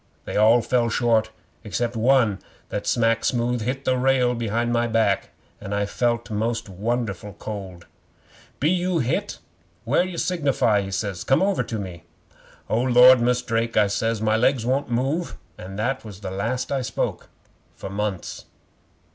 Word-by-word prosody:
They - - -5
all 110 +3 +5
fell 120 -2 +1
short 110 -1 +2 0.3
except 120 +3 -2
one 115 -3 +3 0.3
that - - -4
smack 115 -1 +2
smooth 120 -1 0
hit 130 +4 -3
the 130 -1 +1
rail 130 -1 +3
behind 120 0 -1
my 120 0 +1
back, 110 -3 +1 0.3
an' 100 -1 -5
I 100 0 0
felt 120 +2 -1
most 110 +2 -1
won'erful 105 0 -3
cold. 95 -5 -7 0.7
'"Be 150 +4 +2
you 180 -1 0
hit 125 -5 -1 0.5
anywhere 140 +9 +2
to 180 -2 -7
signify?" 140 - +1
he 95 - -5
says. 100 -2 -3
"Come 135 +7 +3
over 200 -1 +1
to 115 - -4
me." 90 -5 -7 0.7
'"O 115 - +1
Lord, 125 0 +7
Mus' 125 +1 +1
Drake," 115 0 -1
I 105 - +6
says, 110 +2 -1
"my 110 0 +2
legs 120 +1 +2
won't 135 +2 0
move," 135 +8 -1 0.2
and 95 +2 -9
that 125 +5 -1
was 105 -3 -10
the 95 - -5
last 115 +7 -2
I 135 -1 0
spoke 115 -2 -3 0.5
for 95 - -8
months. 100 -2 -4
115 Hz, 165 wpm, -23 LUFS, 105-125 Hz, 0.7 s, Lord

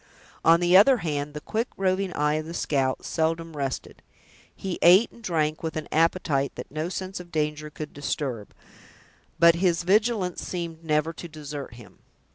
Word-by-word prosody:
On 165 +1 +5
the 175 +1 +4
other 250 +7 +7
hand, 145 -1 -2
the 150 - -5
quick, 225 +8 -2
roving 190 0 0
eye 150 0 +1
of 155 +1 -2
the 165 - -6
scout 135 -5 0
seldom 165 0 -1
rested. 135 -2 -4 0.5
He 190 -2 -5
ate 185 +7 +6
and 235 - -17
drank 155 -4 0
with 160 -2 -4
an 155 - -4
appetite 155 -4 +1
that - - -8
no 155 +3 -3
sense 185 0 -5
of 175 -1 -11
danger 150 -1 -2
could 150 0 -8
disturb, 135 -6 -4 0.8
but 170 0 +7
his 170 0 +1
vigilance 205 -1 +1
seemed 170 -2 -5
never 155 +1 0
to 170 - -8
desert 150 -5 -8
him. 120 -4 -15
160 Hz, 170 wpm, -26 LUFS, 150-180 Hz, 0.8 s, other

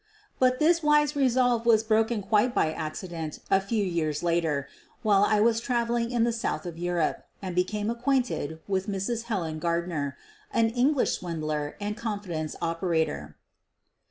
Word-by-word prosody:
But 255 0 +4
this 335 +3 +3
wise 300 -1 +3
resolve 250 -3 +2
was 220 -2 +5
broken 220 0 +1
quite 215 +5 +2
by 155 - +2
accident 160 0 -5
a 195 0 +5
few 205 +2 -1
years 165 -5 -1
later, 165 -5 0 0.4
while 205 -2 +4
I 210 0 +3
was 225 0 +3
traveling 235 -1 0
in 240 -2 +1
the 235 0 +1
south 205 -9 -2
of 170 -1 -6
Europe 175 -2 -1
and 185 -2 -5
became 205 +4 0
acquainted 240 - -1
with 190 0 -1
Mrs. 210 +4 -2
Helen 170 -9 -2
Gardner, 170 -4 -1 0.3
an 225 -1 +3
English 255 +3 +2
swindler 155 -4 -3
and 205 0 -3
confidence 200 -9 -4
opera 165 -1 +1
tor. 75 - -7
200 Hz, 155 wpm, -27 LUFS, 165-235 Hz, 0.4 s, was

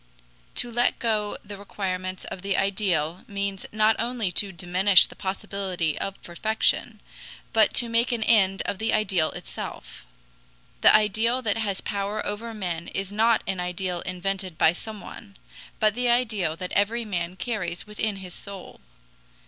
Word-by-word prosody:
To 240 - 0
let 240 +1 +2
go 215 -3 0
the 200 -1 -8
requirements 185 -2 -4
of 185 - -7
the 195 -1 0
ideal 185 -4 0
means 200 -1 -3
not 215 +1 +4
only 235 -5 -1
to 200 +2 +1
diminish 180 +2 +5
the - - -11
possibility 190 -4 -2
of 195 0 -3
perfection, 215 +6 0 0.5
but 220 -2 +5
to 240 - +4
make 230 +2 +2
an 235 -2 0
end 195 -4 +3
of 195 - -2
the 220 - 0
ideal 190 -7 +2
itself. - - -7 0.8
The - - +8
ideal 220 +4 +3
that 215 -1 0
has 200 -3 -1
power 200 +1 -2
over 220 +3 -3
men 175 -6 -4
is 195 0 -4
not 225 +2 +3
an 190 - -2
ideal 180 0 -2
invented 185 -1 -3
by 160 - +5
someone, 205 +1 -9 0.4
but 215 -1 +4
the 245 +1 0
ideal 215 -9 +2
that 180 +2 -6
every 225 +4 +1
man 180 -3 -3
carries 180 -3 -3
within 210 0 -2
his 185 -2 -8
soul. 200 -2 -9
200 Hz, 155 wpm, -26 LUFS, 185-220 Hz, 0.8 s, The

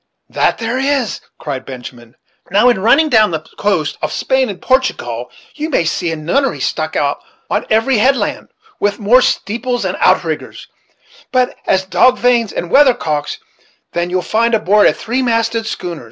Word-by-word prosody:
"That - - +1
there 235 +2 -2
is," 270 -4 -1 0.2
cried 135 -3 -5
Benjamin; 125 -3 -10 0.3
"now, 210 +6 +4
in 235 -5 +1
running 275 +9 +4
down 220 -6 +4
the 160 -2 -4
coast 185 -8 0
of 155 - -2
Spain 265 -2 0
and 195 -3 -6
Portingall, 125 - -1 0.2
you 310 +1 -4
may 260 - +1
see 170 +1 -1
a - - -2
nunnery 220 - -1
stuck - - -2
out - - 0 0.3
on - - -1
every 225 +2 +2
headland, 270 +5 +1 0.3
with 205 0 0
more 235 +4 +4
steeples 245 +2 -1
and - - -2
outriggers - - 0 0.6
such 255 -1 +1
as 190 0 +2
dog 255 +6 +3
vanes 240 -3 +2
and 175 - -5
weathercocks, 165 - +2 0.6
than 175 0 -1
you'll 180 0 -1
find 230 +5 +1
aboard 210 0 +4
of - - +2
a - - -16
three 245 +4 -2
masted 230 -2 0
schooner. 175 -6 -5
220 Hz, 170 wpm, -16 LUFS, 175-255 Hz, 0.6 s, now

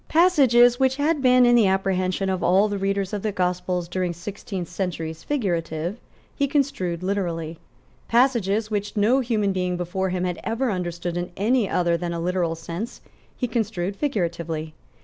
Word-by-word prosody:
Passages, 260 -9 +5
which 265 -1 +3
had 295 +1 +1
been, 250 -1 +5
in 240 - +5
the 230 -4 +5
apprehension 190 0 0
of 190 -1 -1
all 190 +4 +4
the 205 -1 -3
readers 195 0 -1
of 205 - -2
the 215 - -1
Gospels 180 -1 -1
during 180 0 -2
sixteen 190 +1 -6
centuries, 165 -3 -4
figurative, 175 - -2 0.4
he 280 - +1
construed 220 - -1
literally. 170 -4 -2 0.5
Passages, 230 -4 +2
which 205 0 -3
no 225 +6 +4
human 220 -6 0
being 180 -1 -1
before 185 +2 -2
him 180 0 -2
had 180 -1 -2
ever 230 +2 -1
understood 175 -2 -3
in 175 0 -3
any 220 0 +2
other 170 -1 +1
than 170 0 -3
a 170 - -3
literal 175 -1 0
sense, 170 +8 -6 0.4
he 250 - -1
construed 210 -5 -2
figuratively. 170 - -2
190 Hz, 165 wpm, -24 LUFS, 175-230 Hz, 0.5 s, Passages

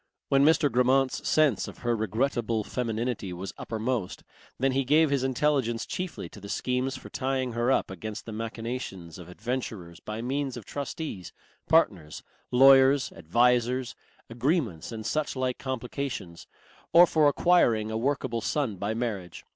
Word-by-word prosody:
When 135 0 +4
Mr. 150 -1 +4
Grammont's 130 +2 +2
sense 150 -10 +3
of - - -10
her 120 -1 +2
regrettable 110 0 -1
femininity 115 -4 -3
was 90 +2 -6
uppermost, 110 -3 -3 0.3
then 135 +1 +1
he 135 +1 +1
gave 150 +3 +4
his 140 -2 +1
intelligence 130 -3 0
chiefly 180 -1 -5
to 100 -1 -11
schemes 130 +4 -1
for - - -12
tying 130 -1 -1
her 120 +2 +1
up 135 - +1
against 105 +4 -7
the 115 - -7
machinations 110 -6 -5
of 90 0 -11
adventurers 100 -5 -5
by 110 +2 -6
means 135 0 -2
of 115 - -9
trustees, 140 - -5 0.4
partners, 95 - +2 0.3
lawyers, 135 +1 +6
advisers, 120 +7 +1 0.3
agreements 120 - -1
and 110 -1 -6
suchlike 130 -3 -1
complications, 130 -8 -5 0.4
or 170 +1 +8
for 155 -3 +3
acquiring 120 -9 +3
a - - -3
workable 130 -2 -1
son 120 -4 -1
by 100 +4 -2
marriage. 105 -7 -4
125 Hz, 140 wpm, -27 LUFS, 110-135 Hz, 0.4 s, or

